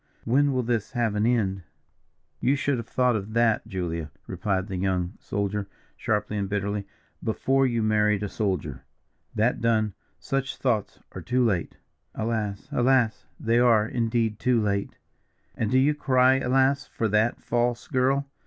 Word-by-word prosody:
when 140 +5 +3
will 130 -1 0
this 115 0 -2
have 120 -4 0
an 105 +2 +1
end?" 100 -6 +1 0.8
"You 135 +3 +2
should 140 -1 0
have 115 - -7
thought 125 -2 +2
of 105 +1 -4
that 115 -2 +2
Julia," 85 -4 -3 0.2
replied 95 +1 -1
the 95 -2 -5
young 90 -1 -1
soldier, 100 0 -2 0.3
sharply 105 0 -1
and 100 -1 -2
bitterly, 100 0 -2 0.4
"before 135 +4 +2
you 115 -2 0
married 105 -1 +2
a - - -1
soldier. 95 - -2 0.5
That 110 +3 +1
done, 110 -3 +1 0.2
such 135 -1 -3
thoughts 115 -6 -1
are - - -7
too 125 0 +1
late." 95 -7 -1 0.4
"Alas, 110 0 -2
alas! 120 - +2
they 115 +1 +2
are, 115 -3 +4
indeed, 115 -3 0
too 125 -2 +2
late." 100 -2 -1 0.6
"And 110 - -1
do 130 - +3
you 140 +3 +4
cry 130 -2 +3
alas! 135 +2 +2
for 115 - -2
that, 105 +3 +2
false 120 0 -1
girl?" 135 +1 +1
110 Hz, 155 wpm, -26 LUFS, 100-125 Hz, 0.8 s, are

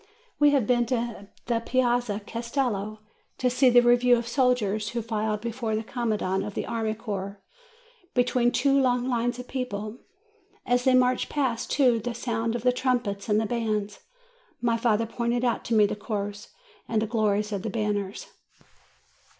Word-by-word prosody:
We 295 0 +6
have 275 -6 +2
been 240 0 +2
to 235 -4 -3 0.2
the 235 -1 +1
Piazza 240 -3 0
Castello, 230 -3 -2 0.4
to 250 -1 +1
see 255 +1 +4
the 245 0 +7
re 240 0 +6
312 - - -3
JUNE - - -3
view 245 -1 +7
of 235 0 -4
soldiers, 235 -5 +1
who 235 +1 -3
filed 215 -1 -2
before 230 -1 -2
the 220 - -2
commandant 215 -5 -1
of 205 0 -6
the - - -2
army 220 -2 -2
corps, 200 -3 -5 0.8
between 245 -1 +2
two 275 +3 +2
long 250 -1 +1
lines 245 -1 0
of 250 0 -8
people. 220 -3 -4 0.7
As 245 0 +1
they 260 -1 +5
marched 255 0 +2
past 260 -6 -1
to 250 -5 +4
the 235 +2 -4
sound 230 -1 -2
of 235 - -4
trumpets 240 -6 -1
and 215 +1 +2
bands, 215 -3 -2 0.6
my 235 -1 +1
father 230 -1 +1
pointed 235 +2 -1
out 240 - 0
to 230 - 0
me 210 -1 +6
the 205 - -2
Corps 205 -1 -4 0.4
and 225 - +1
the 220 - 0
glories 210 -2 0
of 200 -2 -2
the 220 - -3
banners. 205 -2 -2
230 Hz, 175 wpm, -26 LUFS, 210-245 Hz, 0.8 s, the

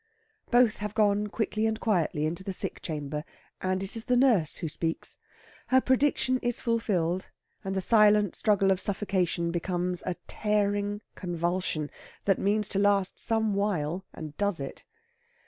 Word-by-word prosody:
Both 245 -3 +4
have 210 0 -5
gone 210 -1 +3
quickly 220 +1 -1
and 220 0 -1
quietly 170 -9 +1
into 170 +4 -3
the 195 -1 -4
sick - - -3
chamber, 150 -2 -4 0.4
and 185 +1 0
it 195 - -4
is 225 - -5
the 250 -1 +2
nurse 230 - +3
who 170 - -3
speaks. 165 +1 -3 0.5
Her 260 - +5
prediction 260 -1 +2
is 240 -1 0
fulfilled, 190 -6 0 0.3
and 195 0 -3
the 190 - 0
silent 210 -1 +4
struggle 195 -3 +3
of 190 - +2
suffocation 185 -4 0
becomes 180 +1 -2
a 180 - -1
tearing 205 -1 0
convulsion, 175 -3 -2 0.3
that 195 -2 +3
means 210 +1 +2
to 195 - -1
last 200 -2 +2
some 220 -2 0
while 190 -4 -1
and 155 -2 -8
does 205 -5 +3
it. 135 -1 -7
200 Hz, 155 wpm, -28 LUFS, 175-215 Hz, 0.5 s, Her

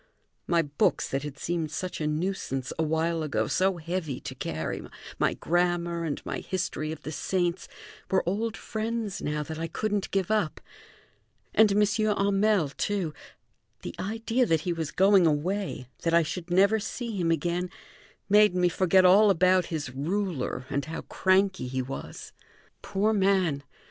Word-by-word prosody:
My 170 -1 +3
books, 145 -1 +1
that 135 - -1
had 145 -1 -7
seemed 165 +1 -2
such 180 +2 -4
a 150 - 0
nuisance 150 -5 -2
a - - +3
while 160 +1 0
ago, 135 -8 0
so 185 - +1
heavy 165 -5 -3
to - - -6
carry, 80 -10 -4 0.4
my - - +2
grammar, 175 0 0
and 150 - -2
my - - -3
history 175 -4 -3
of 160 - -8
the 155 - -5
saints, 175 +2 -1 0.4
were 190 -2 +1
old 220 +4 -1
friends 220 -2 -3
now 150 0 -2
that 160 +2 -6
I 165 - -2
couldn't 205 +3 -2
give 195 0 0
up. 210 -8 0 0.9
And 215 -1 +5
M. 210 +1 +4
Hamel, 205 -4 +2
too; 180 +1 -2 0.7
the - - -5
idea 225 +4 0
that 160 -2 +2
he 175 +1 -1
was 160 -3 -3
going 190 -2 +5
away, 160 -2 -1
that 165 0 +2
I 170 - +5
should 175 +2 -5
never 200 +5 +4
see 230 +2 -4
him 175 -4 0
again, 175 +3 0 0.6
made 210 -2 +5
me 180 -1 +3
forget 185 +1 +4
all 200 +4 +7
about 185 -1 +4
his 150 -5 -4
ruler 160 -2 -2
and 140 0 0
how 160 +1 -5
cranky 190 -5 +1
he 130 +1 -2
was. 135 +2 -8 0.5
Poor 210 +3 0
man! 190 -7 +2
175 Hz, 160 wpm, -27 LUFS, 155-200 Hz, 0.9 s, all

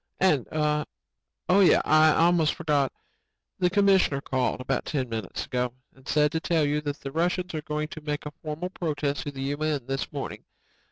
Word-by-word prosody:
"And... 150 -10 +3
oh 150 -1 +1 0.8
yeah, 190 - +5
I 155 +1 +6
almost 165 -2 +3
forgot... 150 -6 +1 0.7
the 180 -1 +3
commissioner 195 -7 +3
called 130 -2 -1
about 130 0 -2
ten 135 -4 -2
minutes 110 -1 -4
ago 125 -1 -2 0.2
and 130 0 -19
said 150 -1 +3
to 160 - 0
tell 160 -2 +1
you 150 +1 0
that 145 -1 -4
the 135 - -6
Russians 180 +3 -1
are 155 - -2
going 150 0 -3
to 155 - -8
make 150 -1 -4
a 150 - -5
formal 160 +4 -4
protest 150 -5 -2
to 145 - -3
the 135 -1 -6
U.N. 145 -1 -1
this 135 +1 -3
morning. 140 -2 -5
150 Hz, 180 wpm, -26 LUFS, 140-160 Hz, 0.8 s, I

